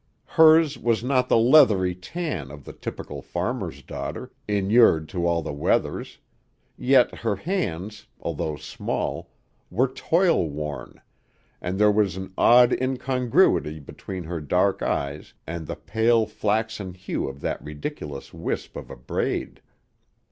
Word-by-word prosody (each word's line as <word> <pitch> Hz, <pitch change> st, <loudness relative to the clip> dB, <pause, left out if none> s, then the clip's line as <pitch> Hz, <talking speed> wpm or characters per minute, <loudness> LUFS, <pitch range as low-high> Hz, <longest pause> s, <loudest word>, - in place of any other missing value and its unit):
Hers 160 Hz, -2 st, +5 dB
was 115 Hz, -1 st, +1 dB
not 125 Hz, -1 st, +1 dB
the -, -, +5 dB
leathery 115 Hz, -7 st, +5 dB
tan 95 Hz, -, -5 dB
of 75 Hz, 0 st, -11 dB
the -, -, -9 dB
typical -, -, -7 dB
farmer's -, -, -4 dB
daughter, -, -, -6 dB, 0.2 s
inured 100 Hz, -5 st, +4 dB
to 85 Hz, -2 st, -1 dB
all 85 Hz, -1 st, +1 dB
weathers, 70 Hz, -1 st, -1 dB, 0.6 s
yet 130 Hz, -1 st, +4 dB
her 110 Hz, -3 st, 0 dB
hands, 105 Hz, -, -3 dB
although 75 Hz, -1 st, -3 dB
small, -, -, -4 dB, 0.4 s
were 120 Hz, +9 st, +2 dB
toil 165 Hz, -, +1 dB
worn, 75 Hz, -1 st, -6 dB, 0.6 s
and 90 Hz, +2 st, -3 dB
there 105 Hz, +1 st, +5 dB
was 100 Hz, -4 st, +1 dB
an 95 Hz, 0 st, -7 dB
odd 120 Hz, +1 st, +6 dB
incongruity 125 Hz, -, +1 dB
between 90 Hz, +5 st, -8 dB
her 85 Hz, 0 st, -5 dB
dark 90 Hz, +6 st, +1 dB
eyes 70 Hz, +2 st, -3 dB
and 80 Hz, -1 st, -6 dB
the 85 Hz, -, -4 dB
pale, 115 Hz, +1 st, +2 dB
flaxen 105 Hz, -3 st, -2 dB
hue 95 Hz, -, -3 dB
of 70 Hz, +1 st, -10 dB
that -, -, -3 dB
ridiculous 75 Hz, -1 st, -7 dB
wisp -, -, -4 dB
of -, -, -8 dB
a -, -, -9 dB
braid. -, -, -3 dB
100 Hz, 135 wpm, -24 LUFS, 80-125 Hz, 0.6 s, odd